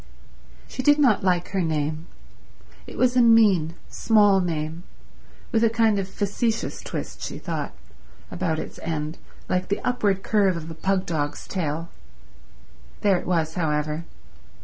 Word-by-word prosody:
She 255 - -5
did 290 +3 +5
not 250 -11 +3
like 180 -2 +1
her 190 -1 0
name. 155 0 -2 0.8
It - - -10
was 250 -1 +3
a 250 - +6
mean, 205 -9 +5
small 205 -3 +4
name, 160 -1 -3 0.7
with 225 0 +2
a 230 - +5
kind 220 -2 +2
of 190 - -3
facetious 220 +3 -2
twist, - - -6
she - - -5
thought, - - -4 0.6
about 165 -4 -1
its - - -6
end 155 0 -3 0.3
like 185 0 0
the 200 - -1
upward 205 -6 0
curve 200 -5 +2
of 165 0 -7
a - - -5
pugdog's 165 -5 -2
tail. 165 -2 -3 1.1
There 195 -3 +3
it - - -9
was, 165 -3 0
however. 155 -1 -1
185 Hz, 145 wpm, -24 LUFS, 160-215 Hz, 1.1 s, a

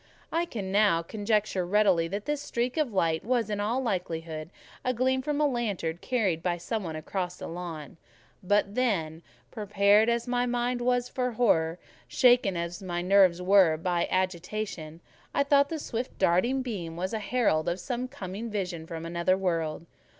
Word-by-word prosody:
I 335 +1 +1
can 205 - -5
now 200 -5 +3
conjecture 210 0 0
readily 185 -3 +3
that 200 +4 -4
this 295 -1 -1
streak 245 -2 -2
of 305 -6 0
light 165 -5 +1
was, 235 -2 0
in 205 - -2
all 220 +5 0
likelihood, 165 -6 -3 0.3
a 255 -1 0
gleam 260 +2 +1
from 295 +2 -2
a 300 - +3
lantern 205 - -1
carried 200 -10 0
by 175 -1 0
some 215 +5 -3
one 160 -3 -5
across 180 +3 -3
the - - -7
lawn: 165 -4 -7 0.4
but 200 +1 +1
then, 170 -10 0 0.3
prepared 210 0 +3
as 235 +1 0
my 245 0 +1
mind 245 0 -1
was 245 0 +1
for 250 -1 -2
horror, 170 -8 +2 0.3
shaken 245 -7 +4
as 170 +1 -4
my 175 -2 -3
nerves 185 -2 +4
were 185 -4 +5
by 175 +1 0
agitation, 185 -3 -3 0.3
I - - +4
thought 280 0 +4
the 325 - -3
swift 245 -4 -5
darting 240 +10 +2
beam 180 -10 -5
was 185 +4 -3
a 220 - -1
herald 205 -9 +1
of 175 +2 -2
some 250 -1 -3
coming 220 -3 -6
vision 180 -6 -4
from 165 -1 -6
another 170 +2 +1
world. 165 -4 -1
200 Hz, 170 wpm, -28 LUFS, 170-240 Hz, 0.4 s, were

